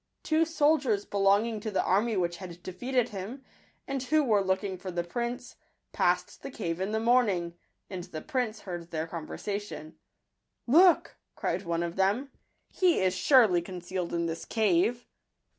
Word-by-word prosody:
Two 320 0 +2
soldiers 295 -9 +2
belonging 205 +3 +2
to 215 +1 -4
the 195 - 0
army 210 +3 +1
which 175 -1 -1
had 175 -2 -10
defeated 245 +6 -1
him, 215 +7 -7 0.4
and 275 -1 -2
who 305 +4 +2
were 215 -6 +3
looking 190 0 -1
for 185 +1 -7
the 175 -1 -2
prince, 240 +7 -4 0.3
passed - - 0
the - - -6
cave 175 -8 -4
in 195 +2 -1
the 220 - 0
morning; 220 -8 +2 0.3
and 180 -3 -6
the 170 -4 -7
prince 240 -5 -2
heard 175 -3 -7
their 160 -1 -2
conversation: 165 +1 -6 0.2
— - - -54
" - - -54 0.2
Look!" 365 -3 +4 0.2
cried 180 +3 -2
one 170 0 -1
of 170 +1 -5
them; 205 +9 +1 0.2
" - - -47
he 360 -2 +5
is 185 -1 +2
surely 190 -2 +5
concealed 180 0 -5
in 170 0 -1
this 165 0 -4
cave." 220 +3 +1
200 Hz, 170 wpm, -29 LUFS, 175-240 Hz, 0.4 s, he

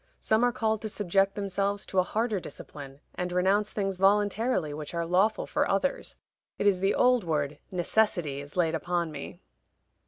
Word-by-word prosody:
Some 220 +2 +2
are 245 - +4
called 220 -2 -1
to 220 - -4
subject 195 -1 +1
themselves 200 0 -2
to 190 - 0
a - - +7
harder 215 +2 -1
discipline, 140 -3 -10
and 180 0 -3
renounce 195 +4 +2
things 195 -2 -2
voluntarily 205 -2 +2
which 150 +2 -6
are 170 0 -1
lawful 190 +6 +2
for - - 0
others. - - -1 0.4
It - - -2
is 195 -3 +4
the 195 +2 +2
old 250 -2 +4
word 150 -3 -2
'necessity' 175 -6 +1
is 145 +4 -11
laid 165 -2 +2
upon 170 +1 -1
me. 145 -2 -8
195 Hz, 175 wpm, -28 LUFS, 170-210 Hz, 0.4 s, a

